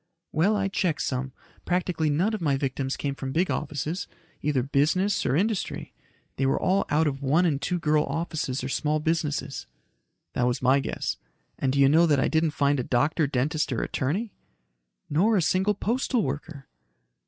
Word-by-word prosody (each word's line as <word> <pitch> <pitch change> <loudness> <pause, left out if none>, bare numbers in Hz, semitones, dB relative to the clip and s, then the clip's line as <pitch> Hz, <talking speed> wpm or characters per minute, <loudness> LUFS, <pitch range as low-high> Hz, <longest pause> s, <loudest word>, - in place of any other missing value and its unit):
"Well, 185 +7 +2
I 195 -1 +1
checked 180 -5 0
some. 130 0 -2 0.3
Practically 175 -3 0
none 175 +10 +1
of 215 - -3
my 145 -4 +1
victims 135 0 -2
came 140 -1 -2
from 135 -1 -5
big 175 +6 +1
offices, 150 +4 -3 0.3
either 140 -4 +1
business 170 +9 +1
or 130 - +2
industry. 205 +4 -1 0.4
They 135 - +1
were 135 - +1
all 190 +2 +2
out 155 +2 +3
of 140 -2 -2
one 150 +6 +3
and 145 -5 +1
two 180 - -1
girl 155 -2 +2
offices 155 -6 -3
or - - -2
small 150 +2 0
businesses." 150 -4 -2 0.7
"That 125 - +1
was 125 - 0
my 130 +2 +4
guess. 135 - -3 0.4
And 130 - +1
do 140 - 0
you 135 - +7
know 165 +4 +5
that 145 -3 +3
I - - +2
didn't 160 0 +2
find 140 -1 +2
a - - 0
doctor, 145 +6 +1
dentist 145 +4 0
or 120 - -1
attorney?" 190 - -2 0.7
"Nor 200 +9 +3
a - - +3
single 190 +6 +2
postal 240 +3 0
worker." 140 0 -5
150 Hz, 180 wpm, -26 LUFS, 135-180 Hz, 0.7 s, you